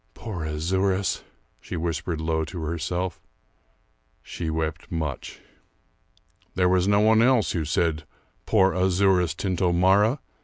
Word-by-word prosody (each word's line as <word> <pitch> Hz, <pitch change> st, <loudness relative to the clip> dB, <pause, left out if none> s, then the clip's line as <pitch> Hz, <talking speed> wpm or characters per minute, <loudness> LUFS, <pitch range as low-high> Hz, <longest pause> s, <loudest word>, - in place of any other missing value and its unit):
Poor 95 Hz, -8 st, -6 dB
Azouras," 95 Hz, +5 st, -1 dB, 0.4 s
she -, -, -6 dB
whispered 85 Hz, 0 st, -3 dB
low 80 Hz, 0 st, -1 dB
to 85 Hz, +2 st, -7 dB
herself. 85 Hz, +2 st, -3 dB, 1.0 s
She 85 Hz, -2 st, -5 dB
wept 80 Hz, 0 st, -3 dB
much. 80 Hz, -6 st, -4 dB, 1.1 s
There 90 Hz, 0 st, +3 dB
was 90 Hz, 0 st, +2 dB
no 100 Hz, 0 st, +4 dB
one 110 Hz, +1 st, +5 dB
else 125 Hz, -2 st, +3 dB
who 80 Hz, -3 st, -2 dB
said 80 Hz, 0 st, 0 dB, 0.4 s
"poor 95 Hz, -3 st, +3 dB
Azouras 90 Hz, -2 st, +2 dB
Tintomara!" 95 Hz, -, +2 dB
90 Hz, 115 wpm, -25 LUFS, 80-95 Hz, 1.1 s, one